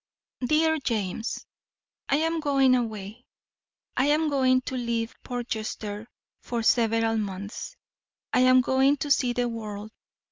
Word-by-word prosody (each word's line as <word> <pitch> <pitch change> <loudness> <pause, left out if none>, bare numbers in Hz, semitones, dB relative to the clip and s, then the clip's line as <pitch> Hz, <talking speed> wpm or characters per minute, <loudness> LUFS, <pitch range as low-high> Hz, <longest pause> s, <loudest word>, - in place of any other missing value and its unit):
DEAR 315 +4 +3
JAMES: 220 -4 -3 0.6
I - - +4
am 325 +2 +1
going 275 -4 +3
away. 220 -1 -4 0.7
I 260 - +2
am 305 +1 +3
going 255 -2 +3
to 260 - -5
leave 235 -2 -2
Portchester 220 -3 -5 0.3
for 235 -2 -3
several 225 -1 +3
months. 200 0 -5 0.6
I - - +4
am 255 0 +6
going 265 +3 +3
to 290 +1 -3
see 250 -3 +3
the 245 0 0
world. 215 -2 -6
245 Hz, 130 wpm, -26 LUFS, 220-270 Hz, 0.7 s, am